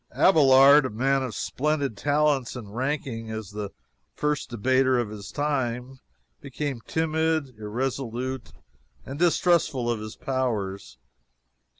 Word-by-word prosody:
Abelard, 140 Hz, -4 st, +6 dB
a -, -, -6 dB
man 135 Hz, +5 st, +1 dB
of 125 Hz, -5 st, -4 dB
splendid 145 Hz, -3 st, -1 dB
talents, 145 Hz, +1 st, +1 dB
and 110 Hz, -4 st, -9 dB
ranking 130 Hz, -4 st, -3 dB
as 110 Hz, -3 st, -6 dB
the 105 Hz, -1 st, -5 dB, 0.5 s
first 150 Hz, -1 st, -1 dB
debater 130 Hz, +3 st, +2 dB
of 120 Hz, -3 st, -1 dB
his 100 Hz, -2 st, -8 dB
time, 130 Hz, -3 st, -2 dB, 0.4 s
became 140 Hz, -2 st, -4 dB
timid, 160 Hz, -2 st, 0 dB
irresolute, 125 Hz, +3 st, -3 dB, 0.5 s
and 140 Hz, +2 st, -7 dB
distrustful 165 Hz, -7 st, +2 dB
of 115 Hz, -, -2 dB
his 110 Hz, 0 st, -7 dB
powers. 115 Hz, -, -3 dB
130 Hz, 115 wpm, -26 LUFS, 115-145 Hz, 0.5 s, Abelard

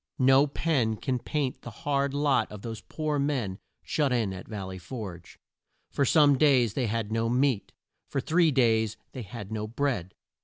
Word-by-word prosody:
No 135 Hz, +2 st, +5 dB
pen 140 Hz, -7 st, 0 dB
can 125 Hz, +3 st, -2 dB
paint 140 Hz, 0 st, -2 dB
the -, -, -8 dB
hard 140 Hz, +4 st, -1 dB
lot 145 Hz, -1 st, +2 dB
of 105 Hz, -2 st, -9 dB
those 115 Hz, -2 st, -6 dB
poor 155 Hz, -2 st, -2 dB
men 125 Hz, -9 st, -1 dB, 0.2 s
shut 145 Hz, -4 st, 0 dB
in 115 Hz, -6 st, 0 dB
at 95 Hz, -, -9 dB
Val 105 Hz, -4 st, -5 dB
ley 95 Hz, 0 st, -7 dB
Forge. 90 Hz, -4 st, -8 dB, 0.5 s
For 140 Hz, -, +1 dB
some 145 Hz, -2 st, +5 dB
days 130 Hz, -8 st, +4 dB
they 125 Hz, -3 st, 0 dB
had 110 Hz, -1 st, -2 dB
no 115 Hz, +1 st, 0 dB
meat. 125 Hz, -3 st, +1 dB, 0.4 s
For 135 Hz, -, -1 dB
three 165 Hz, +5 st, +3 dB
days 110 Hz, -5 st, +2 dB
they 130 Hz, -, -6 dB
had 105 Hz, -1 st, -8 dB
no 110 Hz, -1 st, -3 dB
bread. 120 Hz, -6 st, -2 dB
125 Hz, 180 wpm, -28 LUFS, 110-140 Hz, 0.5 s, No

